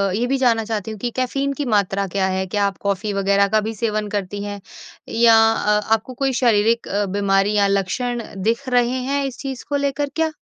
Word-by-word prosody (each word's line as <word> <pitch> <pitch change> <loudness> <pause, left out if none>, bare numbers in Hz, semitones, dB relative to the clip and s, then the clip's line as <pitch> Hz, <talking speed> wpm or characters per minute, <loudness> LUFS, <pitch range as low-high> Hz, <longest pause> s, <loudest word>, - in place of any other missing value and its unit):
ये 235 +3 0
भी 270 +1 +1
जानना 235 -4 +2
चाहती 220 -1 -3
हूँ 215 - -8
कि 245 - -2
कैफ़ीन 275 +2 -1
की 285 +1 -4
मात्रा 200 -3 +1
क्या 190 +1 0
है? 190 0 -1
क्या 205 +2 0
आप 195 -2 -2
कॉफ़ी 200 +1 -1
वगैरह 200 0 +2
का 215 +1 +2
भी 225 - -3
सेवन 215 -1 -1
करती 205 0 -3
हैं 205 0 -5 0.6
या 230 -1 +6 0.2
अ, 210 -1 +1
आपको 225 +4 -1
कोई 270 +1 -1
शारीरिक 230 0 +2
अ, 205 +1 0
बीमारी 195 +1 +1
या 200 -1 +4
लक्षण 215 +5 -1 0.2
दिख 235 +5 0
रहे 245 -1 +3
हैं 275 +2 -1
इस 265 -2 -5
चीज़ 265 -2 -6
को 290 - 0
लेकर 280 0 -1
क्या? 320 -1 +1
220 Hz, 210 wpm, -20 LUFS, 200-250 Hz, 0.6 s, या